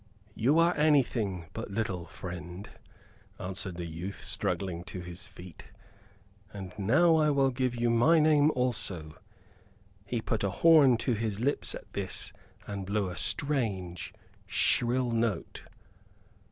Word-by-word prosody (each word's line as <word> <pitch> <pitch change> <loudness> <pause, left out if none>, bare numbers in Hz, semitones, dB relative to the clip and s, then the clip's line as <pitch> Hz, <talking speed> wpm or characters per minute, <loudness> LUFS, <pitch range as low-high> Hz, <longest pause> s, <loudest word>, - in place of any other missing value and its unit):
"You 130 +9 +2
are 170 +1 +4
anything 120 - +2
but 110 0 -5
little, 100 -5 -3
friend," 90 +1 -7 0.7
answered 95 0 -4
the 85 0 -5
youth, 85 +4 -6
struggling 90 -3 -2
to 90 - -6
his 90 +3 -8
feet. 95 -2 -12 0.9
"And 95 -3 -8
now 160 - +4
I 155 -1 +3
will 135 -2 +3
give 125 -1 -1
you 120 0 +1
my 135 +9 +5
name 150 -1 +5
also." 95 -11 -2 0.8
He 115 +4 -2
put 110 -1 -2
a 100 - +2
horn 140 - +6
to 125 - +2
his 110 -2 -2
lips 140 +5 -1
at - - -11
this 100 +1 -2 0.3
and 100 -2 -5
blew 100 -1 0
a - - -7
strange, 100 - -2 0.4
shrill 120 +1 +2
note. 115 -6 -2
110 Hz, 135 wpm, -30 LUFS, 95-130 Hz, 0.9 s, horn